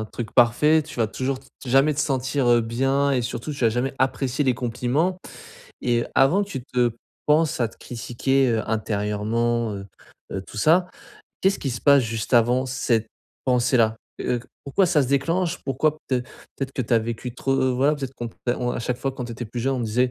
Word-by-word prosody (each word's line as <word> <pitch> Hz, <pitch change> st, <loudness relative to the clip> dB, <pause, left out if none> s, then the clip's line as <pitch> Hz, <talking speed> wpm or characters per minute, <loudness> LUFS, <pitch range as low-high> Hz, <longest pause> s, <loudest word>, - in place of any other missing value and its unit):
un 110 Hz, -, -2 dB
truc 110 Hz, +1 st, -6 dB
parfait 150 Hz, +6 st, +5 dB
tu 155 Hz, -, -11 dB
vas 115 Hz, -2 st, +2 dB
toujours 130 Hz, +4 st, -2 dB
t 135 Hz, -, -21 dB, 0.2 s
jamais 135 Hz, +4 st, +4 dB
te -, -, -8 dB
sentir, 135 Hz, -2 st, 0 dB
heu, 120 Hz, -1 st, +5 dB
bien 135 Hz, +5 st, +1 dB
et 130 Hz, -3 st, +1 dB
surtout 120 Hz, +5 st, -4 dB
tu -, -, -9 dB
vas 115 Hz, -, +5 dB
jamais 125 Hz, +4 st, -1 dB
apprécier 130 Hz, +1 st, 0 dB
les 130 Hz, -, +3 dB
compliments 125 Hz, +9 st, 0 dB, 0.7 s
et 120 Hz, -1 st, +1 dB
avant 170 Hz, +10 st, +4 dB
que -, -, -16 dB
tu 135 Hz, -, -4 dB
te 125 Hz, -2 st, +1 dB, 0.3 s
penses 155 Hz, 0 st, +3 dB
à 120 Hz, -, +2 dB
te -, -, -16 dB
critiquer, 125 Hz, +3 st, 0 dB
heu, 110 Hz, -, +1 dB
intérieurement, 110 Hz, +2 st, 0 dB
heu, 100 Hz, -1 st, -6 dB, 0.5 s
heu, 95 Hz, -, -3 dB
tout -, -, -12 dB
ça, 175 Hz, -, +4 dB, 0.5 s
qu'est-ce 195 Hz, +1 st, +3 dB
qui 135 Hz, -, -2 dB
se 120 Hz, -, -4 dB
passe 140 Hz, -2 st, +6 dB
juste 115 Hz, +2 st, -3 dB
avant 120 Hz, +2 st, +4 dB
cette 120 Hz, -3 st, 0 dB, 0.4 s
pensée-là? 120 Hz, -3 st, +3 dB, 0.2 s
Heu, 120 Hz, -, 0 dB
q -, -, -16 dB, 0.2 s
pourquoi 185 Hz, +8 st, +2 dB
ça 155 Hz, -5 st, +3 dB
se 125 Hz, -, -3 dB
déclenche? 165 Hz, +6 st, 0 dB
Pourquoi 150 Hz, +3 st, 0 dB
peut-être 125 Hz, -2 st, -1 dB, 0.3 s
peut-être 135 Hz, -1 st, -4 dB
que 130 Hz, -, -1 dB
tu 120 Hz, -, -1 dB
as -, -, +6 dB
vécu 115 Hz, +2 st, -5 dB
trop 130 Hz, -1 st, +1 dB
voilà 145 Hz, +4 st, +3 dB, 0.2 s
qu'on 120 Hz, -, -4 dB
p -, -, -23 dB
heu, 120 Hz, -, +2 dB
on 125 Hz, 0 st, -1 dB
à -, -, -3 dB
chaque 120 Hz, +1 st, -2 dB
fois 135 Hz, +1 st, -2 dB
quand 125 Hz, -2 st, -5 dB
tu 120 Hz, -, -7 dB
étais 120 Hz, +1 st, -6 dB
plus 120 Hz, +3 st, -6 dB
jeune 135 Hz, +2 st, +1 dB
on -, -, -3 dB
disait 115 Hz, +3 st, +2 dB
125 Hz, 215 wpm, -24 LUFS, 115-135 Hz, 0.7 s, passe